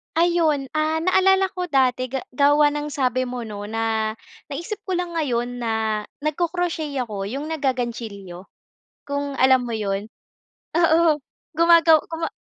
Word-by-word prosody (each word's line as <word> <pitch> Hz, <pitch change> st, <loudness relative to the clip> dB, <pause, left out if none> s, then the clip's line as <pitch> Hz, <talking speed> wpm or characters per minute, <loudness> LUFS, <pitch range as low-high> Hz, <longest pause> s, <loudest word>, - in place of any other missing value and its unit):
Ayun 325 Hz, -5 st, +2 dB
ah, 310 Hz, +1 st, 0 dB
naalala 380 Hz, +1 st, +3 dB
ko 360 Hz, -1 st, -4 dB
dati 255 Hz, -3 st, +2 dB
ga 265 Hz, 0 st, -4 dB
gawa 290 Hz, +2 st, +4 dB
ng 295 Hz, 0 st, -3 dB
sabi 255 Hz, -3 st, 0 dB
mo 245 Hz, -1 st, -5 dB
'no, 205 Hz, -2 st, -7 dB
na 220 Hz, 0 st, -1 dB, 0.3 s
naisip 340 Hz, +9 st, -5 dB
ko 370 Hz, -, 0 dB
lang 355 Hz, -1 st, -2 dB
ngayon 245 Hz, -4 st, -1 dB
na 220 Hz, -2 st, -1 dB, 0.2 s
nagko-crochet 325 Hz, -1 st, -1 dB
ako 200 Hz, -4 st, -5 dB
'yung 280 Hz, +7 st, -5 dB
naggagantsilyo, 230 Hz, -, -4 dB, 0.6 s
kung 285 Hz, -1 st, -3 dB
alam 260 Hz, -1 st, +5 dB
mo 230 Hz, -, -3 dB
'yun. 205 Hz, 0 st, -3 dB, 0.7 s
Oo, 325 Hz, -3 st, +4 dB, 0.4 s
gumagaw 335 Hz, -2 st, +6 dB
guma 330 Hz, 0 st, -3 dB
280 Hz, 135 wpm, -22 LUFS, 235-325 Hz, 0.7 s, gumagaw